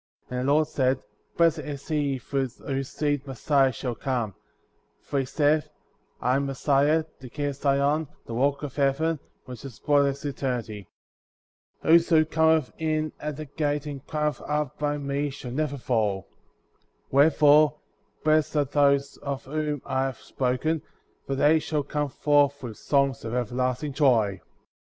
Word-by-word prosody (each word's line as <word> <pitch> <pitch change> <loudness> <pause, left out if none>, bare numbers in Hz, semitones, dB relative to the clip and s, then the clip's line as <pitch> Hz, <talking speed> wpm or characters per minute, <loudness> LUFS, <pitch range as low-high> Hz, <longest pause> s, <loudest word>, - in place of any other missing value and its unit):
And 125 - -2
the - - +3
Lord 155 +1 +3
said: 130 -1 0 0.3
Blessed 165 -1 +4
is 145 -2 -7
he 145 -4 0
through 135 +1 -2
whose 135 +2 -5
seed 145 -2 -1
Messiah 135 +1 +2
shall 125 +1 -4
come; 120 -5 -2 0.7
for 140 - -2
he 135 - 0
saith 150 +3 +1 0.3
— - - -42
I 125 +1 +2
am 140 0 -1
Messiah, 145 +3 +2 0.2
the 130 - -10
King 145 +2 -2
of 140 - -5
Zion, 140 +2 +1 0.2
the 115 - -7
Kock 140 +4 +1
of 140 -3 -5
Heaven, 150 +3 +1 0.3
which 125 -2 -9
is 130 -4 -9
broad 145 0 +3
as 140 +1 -4
eternity; 120 -8 -3 1.0
whoso 165 -1 +5
cometh 160 -2 +2
in 155 -1 0
at 150 -1 -4
the 155 - -6
gate 145 0 -2
and 140 -3 -6
climbeth 150 -1 -1
up 150 -2 -2
by 145 0 0
me 140 0 -2
shall 135 -3 -8
never 145 +1 -1
fall; 110 -7 -1 0.8
where 140 +3 +6
fore, 150 0 +5 0.5
blessed 155 0 +2
are 145 - +3
they 140 0 +4 0.2
of 140 -2 -4
whom 150 0 -2
I 130 0 0
have 130 -3 -4
spoken^ 135 +5 -1 0.5
for 135 - -1
they 150 +4 +4
shall 150 -1 -2
come 145 +1 -2
forth 145 0 +2
with 115 -4 -6
songs 140 -4 +1
of 115 +1 -4
everlasting 125 +4 -1
joy. 115 - +2
140 Hz, 160 wpm, -26 LUFS, 130-150 Hz, 1.0 s, where